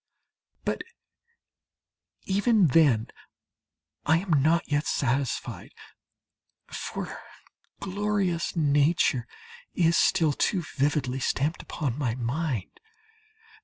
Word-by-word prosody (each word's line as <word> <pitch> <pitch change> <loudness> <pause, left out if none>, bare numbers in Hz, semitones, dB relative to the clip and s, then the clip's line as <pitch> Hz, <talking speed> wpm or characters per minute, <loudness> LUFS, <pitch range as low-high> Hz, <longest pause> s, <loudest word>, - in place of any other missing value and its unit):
But - - -1 1.4
even 200 -2 +3
then 130 -7 +4 0.9
I 160 +2 +4
am 165 -5 +1
not 165 +4 +2
yet 145 +1 0
satisfied, 135 0 -2 0.9
for - - -6 0.6
glorious 200 -3 -1
Nature 145 -4 +2 0.5
is 170 -1 +3
still 160 -5 +3
too 180 +5 0
vividly 135 -2 0
stamped 145 +4 -1
upon 140 -5 -4
my 120 -5 -1
mind. 125 - -3
150 Hz, 85 wpm, -27 LUFS, 135-170 Hz, 1.4 s, then